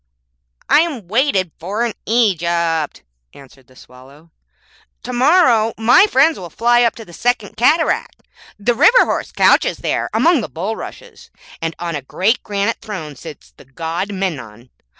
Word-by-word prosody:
'I - - +5
am 290 - -2
waited 210 - 0
for 205 +8 -2
in 230 - -3
Egypt,' 170 - 0 0.3
answered 135 -2 -17
the 130 - -22
Swallow. 135 +7 -17 0.7
To 250 - -6
morrow 245 -5 +3
my 245 - +5
friends 315 -1 +2
will 175 -2 -8
fly 240 +7 +2
up 235 -2 +2
to 225 - -10
the 175 - -15
Second 235 0 -2
Cataract. 310 +8 +1 0.3
The 225 +4 0
river 465 - +5
horse - - -3
couches - - +3
there - - -2
among 330 -5 +2
the 185 - -6
bulrushes, 190 - -7 0.3
and 165 -1 -3
on 170 -1 -4
a 145 - -4
great 195 - 0
granite 205 +2 -2
throne 175 -10 -7
sits 155 +3 -12
the - - -17
God 165 +8 -5
Memnon. 130 - -5
200 Hz, 150 wpm, -17 LUFS, 160-240 Hz, 0.7 s, I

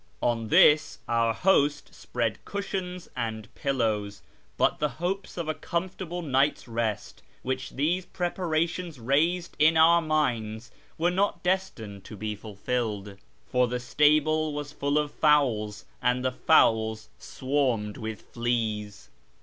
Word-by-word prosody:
On 115 -2 0
this 150 +7 +5
our 115 -1 +2
host 145 +1 +2
spread 115 -3 -3
cushions 190 -3 -4
and 110 -3 -4
pillows, 105 -7 -1 0.3
but - - +2
the 150 - +1
hopes 185 +4 -3
of 170 -2 -3
a 155 - 0
comfortable 175 +2 -4
night's 135 -2 +1
rest 115 -3 -3 0.2
which 130 0 -3
these 170 +6 -1
preparations 170 -3 -2
raised 160 +9 +1
in 160 +2 +5
our 170 +2 +6
minds 120 -8 -1 0.3
were 175 +2 +2
not 195 +2 0
destined 150 - -2
to 105 - -9
be 105 +1 -3
fulfilled, 105 -1 -4 0.3
for 125 0 +2
the 125 +1 -2
stable 155 +3 +2
was 145 -1 -5
full 145 0 -1
of 150 -1 0
fowls, 120 -9 +2 0.2
and 125 +1 +1
the 130 - +2
fowls 110 -6 +3
swarmed 130 -6 -1
with 110 -1 -6
fleas. 110 -3 -3
135 Hz, 130 wpm, -27 LUFS, 110-160 Hz, 0.3 s, our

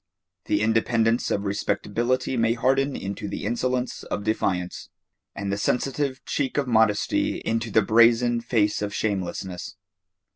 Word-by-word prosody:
The 105 - +1
independence 115 +1 +2
of 100 - -1
respectability 120 +5 -1
may 115 -1 +2
harden 135 +3 +1
into 100 +1 -5
the 100 - -5
insolence 125 +2 -1
of 105 - -4
defiance, 90 -4 -2 0.5
and 100 0 -3
the 100 - -2
sensitive 135 +3 -1
cheek 135 -2 -2
of 140 -2 +1
modesty 110 -3 +2
into 115 +1 -1
the 110 0 +3
brazen 115 +2 +4
face 110 -4 +1
of 105 0 -3
shamelessness. 95 -3 -3
115 Hz, 135 wpm, -25 LUFS, 105-125 Hz, 0.5 s, brazen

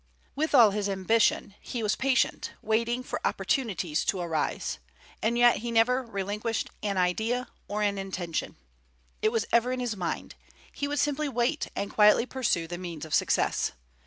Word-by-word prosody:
With 305 +1 +1
all 230 -5 +8
his 205 0 -1
ambition, 200 +1 +2
he 235 -3 -4
was 210 - +1
patient, 260 -2 +1
waiting 235 +3 0
for - - -4
opportunities 195 - 0
to 190 - 0
arise; 165 -3 -2 0.4
and 235 +2 +1
yet 240 0 +6
he 235 - -4
never 235 +3 +3
relinquished 210 +1 -3
an 200 -2 -1
idea 220 +8 0 0.2
or 210 +1 -1
an 200 -1 0
intention, 180 -4 -4 0.7
it 215 - +3
was 225 -1 0
ever 235 +2 +3
in 255 - -2
his 240 -3 -2
mind: 180 -4 -4 0.4
he 285 - -2
would 290 +1 -2
simply 290 +1 0
wait, 250 +5 0
and 200 0 -3
quietly 210 +2 +5
pursue 250 -11 0
the 175 +1 -6
means 170 -4 -6
of 155 - -8
success. - - +1
220 Hz, 165 wpm, -28 LUFS, 195-245 Hz, 0.7 s, all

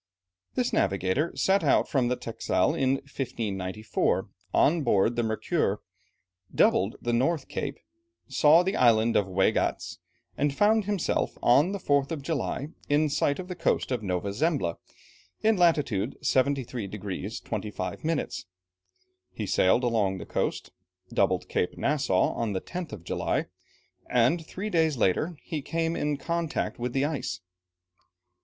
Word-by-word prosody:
This 250 -1 0
navigator 95 - +1
set 195 +1 +2
out - - +3
from 130 -4 +1
the 125 - +1
Texel 120 +5 0
in 135 -5 +2
1594, 110 -7 -2 0.2
on 165 +3 +3
board 115 -3 +2
the 120 - +1
Mercure, 110 -1 0 0.8
doubled 95 +4 +3
the 120 - -2
North 135 +5 +1
Cape, 140 -1 -4 0.5
saw 160 +3 +5
the 190 +2 -1
island 115 -2 +4
of 100 - +3
Waigatz, 95 -1 0 0.4
and 140 0 0
found 215 0 +4
himself, 205 -4 -1
on 145 +9 +5
the 200 - -2
4th 140 -6 +1
of 150 -4 -4
July, 145 -1 -2 0.2
in 150 +1 +3
sight 145 0 +1
of 185 - -6
the 180 - -4
coast 175 - 0
of 125 -3 0
Nova 95 0 -2
Zembla, 130 - 0 0.6
in 220 0 +4
latitude 145 - +2
73 130 -5 0
degrees 100 +1 -5
25 105 -3 -5
minutes. 160 - -2 0.8
He - - -5
sailed 95 +7 +3
along 105 -6 +1
the - - -7
coast, - - -2 0.4
doubled - - +1
Cape 90 - -1
Nassau 135 -11 +1
on 115 -3 -2
the 95 - -2
10th 175 -2 -6
of 105 -6 -8
July, - - -1 0.6
and 125 +8 +3
three 195 +6 -5
days 160 -4 +2
later 150 - +1
he 155 -3 -4
came 165 +3 -1
in 150 -1 -1
contact 165 -1 -2
with 120 0 -3
the 135 +1 +1
ice. 140 - -3
135 Hz, 145 wpm, -27 LUFS, 110-160 Hz, 0.8 s, saw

